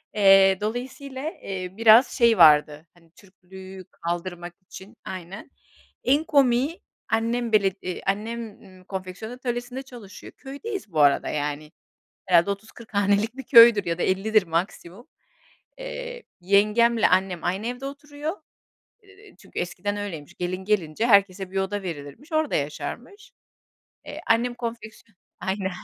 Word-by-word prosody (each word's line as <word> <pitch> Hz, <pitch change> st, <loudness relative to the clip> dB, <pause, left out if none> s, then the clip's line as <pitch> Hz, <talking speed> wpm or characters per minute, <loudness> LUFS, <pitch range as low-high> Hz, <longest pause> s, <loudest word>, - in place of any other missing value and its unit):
Eee, 195 Hz, -2 st, +6 dB
dolayısıyla, 260 Hz, +6 st, -5 dB
eee, 185 Hz, -2 st, -5 dB
biraz 225 Hz, +3 st, +7 dB
şey 235 Hz, -3 st, +3 dB
vardı, 150 Hz, -1 st, +5 dB
hani, 165 Hz, -2 st, -25 dB
Türklüğü 190 Hz, 0 st, -13 dB
kaldırmak 175 Hz, +1 st, -5 dB
için 190 Hz, +3 st, -13 dB
Aynen. 185 Hz, +6 st, -8 dB, 0.5 s
En 280 Hz, +5 st, +2 dB
komiği 280 Hz, +1 st, +2 dB, 0.3 s
annem 230 Hz, +1 st, 0 dB
bele 200 Hz, -2 st, +4 dB
iii, 180 Hz, -1 st, -5 dB
annem, 220 Hz, +2 st, -3 dB
iii, 185 Hz, -1 st, -17 dB
konfeksiyon 190 Hz, +3 st, -7 dB
atölyesinde 245 Hz, +1 st, -5 dB
çalışıyor. 240 Hz, -7 st, -12 dB
Köydeyiz 285 Hz, -, -7 dB
bu 155 Hz, -, 0 dB
arada, 145 Hz, -1 st, +3 dB
yani. 150 Hz, +1 st, -4 dB, 0.6 s
Herhâlde 175 Hz, +1 st, +4 dB
30-40 220 Hz, +2 st, -8 dB
hanelik 205 Hz, +4 st, +1 dB
bir 270 Hz, -, -7 dB
köydür 230 Hz, -5 st, +7 dB
ya 170 Hz, 0 st, -2 dB
da -, -, -1 dB
50'dir 210 Hz, +3 st, +2 dB
maksimum. 175 Hz, +5 st, -4 dB, 0.7 s
Eee, -, -, -7 dB, 0.2 s
yengemle 210 Hz, +5 st, +3 dB
annem 185 Hz, -2 st, 0 dB
aynı 190 Hz, +5 st, -2 dB
evde 245 Hz, +3 st, -5 dB
oturuyor. 290 Hz, +2 st, -6 dB, 0.7 s
Eee, 400 Hz, 0 st, -19 dB
çünkü -, -, -10 dB
eskiden 180 Hz, +4 st, -3 dB
öyleymiş. 175 Hz, -6 st, -7 dB
Gelin 180 Hz, +1 st, -4 dB
gelince 195 Hz, -1 st, 0 dB
herkese 195 Hz, -3 st, +3 dB
bir 195 Hz, -, -9 dB
oda 195 Hz, +1 st, -2 dB
verilirmiş. 170 Hz, -, -8 dB
Orada 310 Hz, -1 st, 0 dB
yaşarmış. 245 Hz, -, -6 dB, 0.7 s
Eee, -, -, -8 dB
annem 240 Hz, +2 st, +2 dB
konfeksiyon 230 Hz, -2 st, -8 dB, 0.2 s
Aynen. 190 Hz, 0 st, -2 dB
205 Hz, 130 wpm, -24 LUFS, 185-245 Hz, 0.7 s, biraz